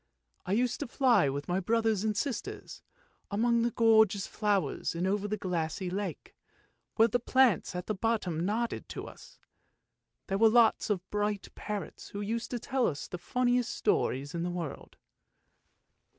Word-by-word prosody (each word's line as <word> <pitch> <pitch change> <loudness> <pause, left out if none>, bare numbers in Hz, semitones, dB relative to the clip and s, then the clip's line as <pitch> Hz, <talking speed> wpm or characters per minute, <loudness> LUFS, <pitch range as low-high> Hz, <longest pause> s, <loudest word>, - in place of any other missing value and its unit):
" - - -44
I 185 - 0
used 245 +3 +1
to 290 - -3
fly 235 - +3
with 140 +1 -4
my 180 +2 0
brothers 220 0 +1
and 215 -2 0
sisters, 275 0 -4 0.5
among 235 +3 +2
gorgeous 220 -3 +4
flowers 205 -5 -1
and 175 +2 -1
over 200 +2 0
the 215 +1 -2
glassy 175 -1 -2
lake, 200 +2 -4 0.6
where 225 0 +6
the 245 +2 0
plants 245 -6 +2
at 180 0 -4
the 215 - -1
bottom 195 -6 -1
nodded 230 +5 -2
to - - -6
us. - - -13 0.9
There 195 +1 -2
were 225 0 +7
lots 225 -1 +4
of 190 -3 -1
bright 205 -1 -1
parrots, 210 -2 -6
who 200 - -6
used 225 +3 -3
to 245 - -2
tell 255 +1 0
us 145 -1 -4
the 180 - -6
funniest 245 +4 0
stories 140 - 0
in 170 - -2
the 175 - -1
world." 175 -5 -6
210 Hz, 165 wpm, -30 LUFS, 180-230 Hz, 0.9 s, were